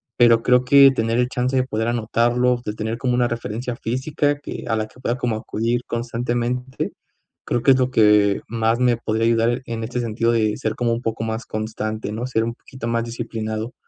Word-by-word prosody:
pero 115 Hz, -1 st, +5 dB
creo 125 Hz, 0 st, +4 dB
que 140 Hz, +1 st, +7 dB
tener 115 Hz, -2 st, 0 dB
el 125 Hz, 0 st, +2 dB
chance 125 Hz, 0 st, -1 dB
de 130 Hz, -, +3 dB
poder 110 Hz, -3 st, -2 dB
anotarlo, 120 Hz, +2 st, +1 dB
de 105 Hz, -, -3 dB
tener 110 Hz, +1 st, -3 dB
como 125 Hz, -2 st, 0 dB
una 125 Hz, 0 st, +2 dB
referencia 120 Hz, +1 st, -4 dB
física 145 Hz, +4 st, -1 dB
que -, -, -7 dB
a 115 Hz, -, +1 dB
la 110 Hz, -1 st, -1 dB
que 125 Hz, -, -20 dB
pueda 120 Hz, -1 st, -1 dB
como 120 Hz, -3 st, -1 dB
acudir 115 Hz, +2 st, -1 dB
constantemente, 120 Hz, +2 st, -2 dB, 0.5 s
creo 120 Hz, -, -1 dB
que 135 Hz, -, +6 dB
es 130 Hz, -, +4 dB
lo 130 Hz, 0 st, +2 dB
que 105 Hz, -3 st, +4 dB
más 115 Hz, 0 st, 0 dB
me 125 Hz, -2 st, +3 dB
podría 110 Hz, 0 st, -1 dB
ayudar 115 Hz, +2 st, +2 dB
en 115 Hz, -1 st, -4 dB
este 125 Hz, +2 st, -3 dB
sentido 115 Hz, 0 st, 0 dB
de 110 Hz, -2 st, +1 dB
ser 110 Hz, 0 st, -2 dB
como 120 Hz, -1 st, 0 dB
un 115 Hz, -, -3 dB
poco 115 Hz, -1 st, -3 dB
más 110 Hz, +1 st, -3 dB
constante, 110 Hz, 0 st, -4 dB
¿no? 115 Hz, +4 st, -3 dB
Ser 110 Hz, -3 st, 0 dB
un 115 Hz, +1 st, -2 dB
poquito 130 Hz, -2 st, -8 dB
más 115 Hz, 0 st, 0 dB
disciplinado. 115 Hz, -1 st, -4 dB
115 Hz, 210 wpm, -21 LUFS, 110-125 Hz, 0.5 s, que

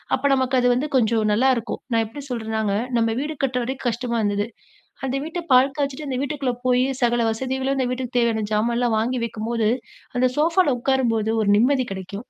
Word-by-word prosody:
அப்ப -, -, -8 dB
நமக்கு 260 Hz, -1 st, +1 dB
அது 245 Hz, -, +2 dB
வந்து 260 Hz, +5 st, -1 dB
கொஞ்சம் 225 Hz, -3 st, +3 dB
நல்லாருக்கும். 245 Hz, +1 st, +1 dB
நான் 225 Hz, -1 st, +3 dB
எப்டி 230 Hz, +7 st, -9 dB
சொல்றேன்னாங்க, 220 Hz, -3 st, -2 dB, 0.2 s
நம்ம 225 Hz, -1 st, +2 dB
வீடு 300 Hz, +3 st, -3 dB
கட்டுற 250 Hz, -2 st, 0 dB
வரைக்கும் 260 Hz, +1 st, -4 dB
கஷ்டமா 235 Hz, +1 st, -2 dB
இருந்தது, 205 Hz, 0 st, 0 dB, 0.6 s
அந்த 265 Hz, +1 st, -1 dB
வீட்ட 325 Hz, +3 st, -4 dB
பால் 260 Hz, +2 st, +5 dB
காய்ச்சிட்டு 285 Hz, +1 st, -2 dB
அந்த 260 Hz, -2 st, -2 dB
வீட்டுக்குள்ள 280 Hz, -3 st, -2 dB
போயி 250 Hz, 0 st, +3 dB, 0.2 s
சகல 240 Hz, -1 st, +2 dB
வசதிகளும் 265 Hz, +4 st, -2 dB
அந்த 260 Hz, -, +1 dB
வீட்டுக்கு 250 Hz, -1 st, -4 dB
தேவையான 230 Hz, -2 st, +1 dB
ஜாமான்லாம் 235 Hz, +2 st, +1 dB
வாங்கி 245 Hz, +3 st, -1 dB
வைக்கும்போது, 225 Hz, 0 st, -1 dB, 0.5 s
அந்த 255 Hz, +1 st, +3 dB
சோஃபால 325 Hz, -3 st, +3 dB
உக்காரும்போது 235 Hz, -4 st, +1 dB
ஒரு 200 Hz, -, +2 dB
நிம்மதி 255 Hz, +2 st, +2 dB
கிடைக்கும். 195 Hz, +3 st, -7 dB
245 Hz, 175 wpm, -22 LUFS, 225-265 Hz, 0.6 s, பால்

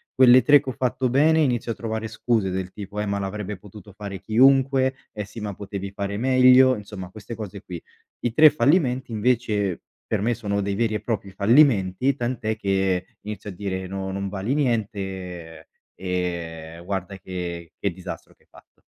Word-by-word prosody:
Quelle 130 Hz, 0 st, +7 dB
3 145 Hz, -1 st, +6 dB
che 135 Hz, -, -6 dB
ho -, -, -3 dB
fatto 125 Hz, +1 st, -1 dB
bene 155 Hz, +5 st, +4 dB
inizio 120 Hz, -4 st, 0 dB
a -, -, -15 dB
trovare 110 Hz, -1 st, -4 dB
scuse 110 Hz, -2 st, 0 dB
del 95 Hz, 0 st, -3 dB
tipo: 105 Hz, 0 st, -7 dB
"Eh, -, -, -2 dB
ma 100 Hz, 0 st, -1 dB
l'avrebbe 100 Hz, 0 st, -4 dB
potuto 105 Hz, +2 st, -13 dB
fare 100 Hz, -1 st, -7 dB
chiunque, 130 Hz, +3 st, +4 dB, 0.2 s
eh, 105 Hz, -2 st, -5 dB
sì 105 Hz, +2 st, -10 dB
ma 105 Hz, -2 st, -4 dB
potevi 100 Hz, 0 st, -6 dB
fare 100 Hz, 0 st, -4 dB
meglio." 130 Hz, +1 st, +6 dB
Insomma 100 Hz, -3 st, -8 dB
queste 110 Hz, +3 st, -9 dB
cose 105 Hz, -2 st, -7 dB
qui. 90 Hz, -4 st, -8 dB, 0.4 s
I 120 Hz, -, -1 dB
3 155 Hz, +5 st, +8 dB
fallimenti 135 Hz, -5 st, +1 dB
invece, 110 Hz, -4 st, 0 dB, 0.3 s
per 110 Hz, -3 st, -1 dB
me 120 Hz, +3 st, +1 dB
sono 100 Hz, -3 st, -2 dB
dei 100 Hz, 0 st, -2 dB
veri 110 Hz, 0 st, 0 dB
e 105 Hz, -, -2 dB
propri 100 Hz, -4 st, -3 dB
fallimenti, 115 Hz, +2 st, +3 dB
tant'è 120 Hz, -3 st, -2 dB
che 95 Hz, -3 st, 0 dB, 0.2 s
inizio 105 Hz, 0 st, -6 dB
a 100 Hz, -, -7 dB
dire: 95 Hz, -1 st, -4 dB
"No 95 Hz, 0 st, -4 dB
non 100 Hz, 0 st, -3 dB
vali 100 Hz, +7 st, -2 dB
niente, 95 Hz, -, -3 dB, 0.3 s
ehm, 85 Hz, -3 st, -4 dB
guarda 95 Hz, 0 st, -4 dB
che 85 Hz, -3 st, -6 dB
che 100 Hz, -, -1 dB
disastro 90 Hz, +1 st, -9 dB
che -, -, -32 dB
hai -, -, -36 dB
fatto." -, -, -21 dB
105 Hz, 180 wpm, -24 LUFS, 95-120 Hz, 0.4 s, 3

